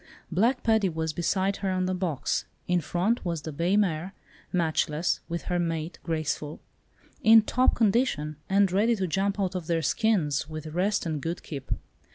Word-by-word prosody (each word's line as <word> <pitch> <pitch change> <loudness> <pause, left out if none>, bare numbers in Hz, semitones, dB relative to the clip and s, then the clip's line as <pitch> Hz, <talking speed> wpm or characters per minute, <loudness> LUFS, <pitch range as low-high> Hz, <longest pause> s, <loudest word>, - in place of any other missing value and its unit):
Black 230 +9 +2
Paddy 220 -4 +3
was 160 -1 -2
beside 190 +4 0
her 195 - -2
on 185 0 0
the 185 - 0
box; 180 -7 -1 0.2
in 180 -1 +2
front 185 +10 0
was 170 -4 -3
the 160 - -5
bay 170 +7 +1
mare, 185 -2 0 0.4
"Matchless," 160 -1 +1
with 170 0 -3
her 180 -1 -1
mate 165 -1 -2
"Graceful," 155 -2 -3 0.6
in 220 0 +7
top 255 +4 +2
condition, 200 - +1
and 195 -1 +4
ready 220 +5 +3
to 195 -3 -1
jump 195 +3 0
out 190 -2 0
of 180 -4 -4
their 165 -1 0
skins, 160 - +1
with 155 0 -6
rest 180 +7 0
and 155 -3 -2
good 165 +3 -4
keep. 135 -4 -7
180 Hz, 175 wpm, -27 LUFS, 160-200 Hz, 0.6 s, in